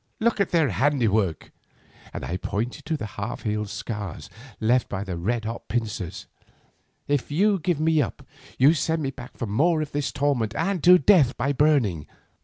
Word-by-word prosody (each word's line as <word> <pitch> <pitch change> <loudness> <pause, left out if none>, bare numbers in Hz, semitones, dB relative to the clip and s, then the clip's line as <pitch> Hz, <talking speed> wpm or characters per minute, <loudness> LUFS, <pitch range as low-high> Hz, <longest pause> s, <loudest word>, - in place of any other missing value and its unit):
Look 220 -2 +1
at 195 - +1
their 160 -5 +2
handiwork,' 110 - +1 0.6
and - - -6
I 90 - -3
pointed 105 +6 -4
to 160 - -1
the 125 - -5
half 100 +1 -6
healed 105 -1 -2
scars 100 -6 -6 0.3
left 120 +3 +2
by 100 0 -3
the 95 -3 -5
red 110 +7 -2
hot 115 +1 -5
pincers; 105 -6 -3 0.8
'if 145 -3 0
you 195 +6 +2
give 170 -2 0
me 160 -1 +3
up, - - -5 0.3
you 140 +5 +6
send 160 +1 -1
me 135 - -1
back 125 -2 -11
to 120 - -3
more 155 +11 +2
of 155 -1 -3
this 145 -2 -2
torment 125 -6 0
and 195 +4 -1
to 180 +1 +9
death 170 -10 +4
by 140 +3 0
burning. 125 - +2
125 Hz, 180 wpm, -25 LUFS, 105-155 Hz, 0.8 s, to